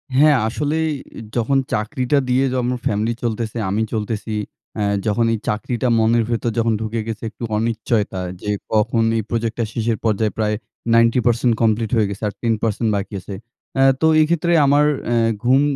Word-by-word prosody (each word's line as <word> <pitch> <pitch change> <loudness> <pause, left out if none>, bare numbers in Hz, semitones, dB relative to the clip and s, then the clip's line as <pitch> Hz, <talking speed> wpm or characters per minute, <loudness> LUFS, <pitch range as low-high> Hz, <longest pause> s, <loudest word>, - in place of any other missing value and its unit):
হ্যাঁ, 145 0 +6
আসলেই 155 +6 -1 0.3
এ - - -6 0.2
যখন 125 +3 +2 0.2
চাকরিটা 125 +6 0
দিয়ে 130 +2 +3
যেমন 125 - 0
আমার 125 - -3
ফ্যামিলি 110 +3 0
চলতেসে, 115 0 -2
আমি 105 +3 0
চলতেসি। 110 0 -3 0.4
অ্যা 105 - 0 0.2
যখন 115 +2 +2
এই - - 0
চাকরিটা 115 +4 -1
মনের 115 +1 +3
ভেতর 115 0 0
যখন 115 -1 +2
ঢুকে 110 +1 -2
গেছে 115 0 -5
একটু 115 - -11
অনিচ্চয়তা 110 -3 -1 0.2
যে 105 - -2 0.2
কখন 110 +1 +2
এই 110 - -1
প্রজেক্টটা 115 0 -1
শেষের 115 -1 0
পর্যায়ে 110 0 +1
প্রায় 105 -1 +1 0.4
90% 115 0 +3
কমপ্লিট 110 -1 +2
হয়ে 110 -3 +2
গেছে 100 +2 -7
আর 100 - -3
10% 115 -1 0
বাকি 100 +2 -4
আছে। 100 - -7 0.4
অ্যা 135 0 +4 0.2
তো 160 - +4
এই - - +5
ক্ষেত্রে 170 0 +1
আমার 145 +2 +4 0.2
অ্যা 120 0 +1 0.3
ঘুম 130 +3 +4
115 Hz, 170 wpm, -20 LUFS, 110-125 Hz, 0.4 s, হ্যাঁ